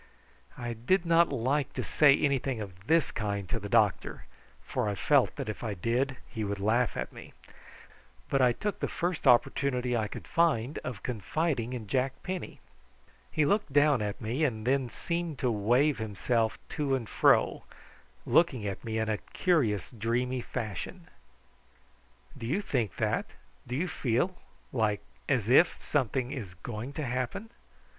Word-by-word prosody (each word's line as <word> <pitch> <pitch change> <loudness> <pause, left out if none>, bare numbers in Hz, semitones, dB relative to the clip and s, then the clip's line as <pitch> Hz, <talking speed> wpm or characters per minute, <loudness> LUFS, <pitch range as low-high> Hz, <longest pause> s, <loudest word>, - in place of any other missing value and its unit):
I 120 -1 -3
did 170 - +1
not 170 0 +5
like 135 +3 0
to - - -3
say 145 -2 +5
anything 135 -3 0
of 95 -2 -9
this 165 -3 +3
kind 100 -3 -3
to 115 - -1
the 105 -1 -7
doctor, 105 -3 +2 0.4
for 120 - -1
I 100 - -2
felt - - +3
that - - -5
if 105 - -5
I 110 -3 -2
did 125 +8 0
he 110 -3 -4
would 100 0 -2
laugh 115 +4 +1
at - - -4
me; - - -11 0.9
but 135 - +1
I 125 -1 +5
took 205 - -3
the - - -1
first 175 -1 -2
opportunity 125 0 +3
I 110 -2 0
could - - -8
find 150 -6 +1
of 125 -4 -6
confiding 125 - -1
in 120 -3 -5
Jack 130 +5 0
Penny. 185 -3 -5 0.7
He 155 - +2
looked 200 -1 +1
down 145 -3 +4
at 105 -1 -3
me 120 +7 -1
and 110 -7 0
then 130 -1 +1
seemed 170 +4 -3
to 125 -1 +1
wave 120 +7 +2
himself 110 +2 0
to 145 -4 0
and 120 -4 -4
fro, - - +3 0.6
looking 135 -11 +3
at 100 -2 -4
me 110 -1 -3
in 110 0 0
a 110 -1 0
curious 120 - 0
dreamy 120 +3 -1
fashion. 165 - -5 1.3
"Do 115 - -6
you 155 +11 +1
think 125 - -1
that? - - 0 0.4
do 125 - -3
you 170 +7 0
feel 155 +4 0 0.4
like 110 -5 +1 0.3
as 115 -6 +1
if 135 +8 +5
something 130 -2 0
is 100 -10 -6
going 110 +7 -6
to 150 0 -3
happen?" 130 - -3
125 Hz, 165 wpm, -29 LUFS, 110-145 Hz, 1.3 s, not